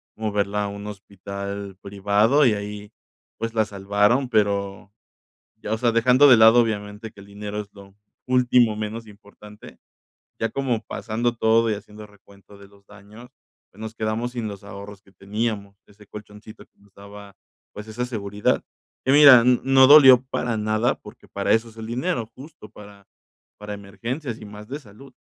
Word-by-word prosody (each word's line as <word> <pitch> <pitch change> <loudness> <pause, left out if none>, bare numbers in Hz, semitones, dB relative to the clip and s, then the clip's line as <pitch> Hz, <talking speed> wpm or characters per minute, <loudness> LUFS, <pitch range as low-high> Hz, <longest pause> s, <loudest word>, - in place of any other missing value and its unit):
moverla 105 -1 -2
a - - -3
un 100 +1 -8
hospital 100 0 -8
privado, 105 +8 +2
y 115 - +4
ahí, 105 +1 -7 0.5
pues, 115 0 -4
la 110 - +2
salvaron, 105 +6 0
pero, 100 -2 -1 0.7
ya, 110 - -4
o - - -1
sea, 120 -2 +2
dejando 125 +5 +4
de 120 - +7
lado, 115 +2 +7
obviamente, 105 0 -4
que - - -18
el - - -14
dinero 105 +1 -7
es 100 - -14
lo 100 -1 -16 0.3
último 125 -3 +3
menos 110 +1 -6
importante, 105 0 -16 0.6
ya 115 - 0
como 130 -5 -2
pasando 115 +2 -3
todo 115 0 +2
y 105 - 0
haciendo 105 +1 -11
recuento 100 0 -20
de 100 - -15
los 100 0 -24
daños, 105 +4 -15 0.4
pues, 100 - -23
nos 110 0 -7
quedamos 110 +2 -3
sin 120 -3 -4
los 100 -1 -10
ahorros 100 0 -11
que 95 - -24
teníamos, 100 0 -4
ese 105 0 -20
colchoncito 105 +1 -13
que - - -42
nos 100 -1 -26
daba, 100 0 -13 0.4
pues, 105 +1 -9
esa 120 +3 -4
seguridad, 105 -3 -2 0.4
y 135 - +3
mira, 140 -5 +8
n 125 0 +3
no 135 0 +6
dolió 135 -4 +8
para 120 -2 -2
nada, 110 +4 0
porque 105 - -16
para 100 0 -1
eso 115 +1 +1
es 110 - -21
el 110 -1 -8
dinero, 125 +2 -2
justo 135 -6 -14
para 100 -2 -15 0.5
para 105 0 -7
emergencias 115 +6 -6
y - - -10
más 105 +1 -12
de 140 +3 -6
salud, 115 +4 -16
105 Hz, 175 wpm, -22 LUFS, 100-115 Hz, 0.7 s, mira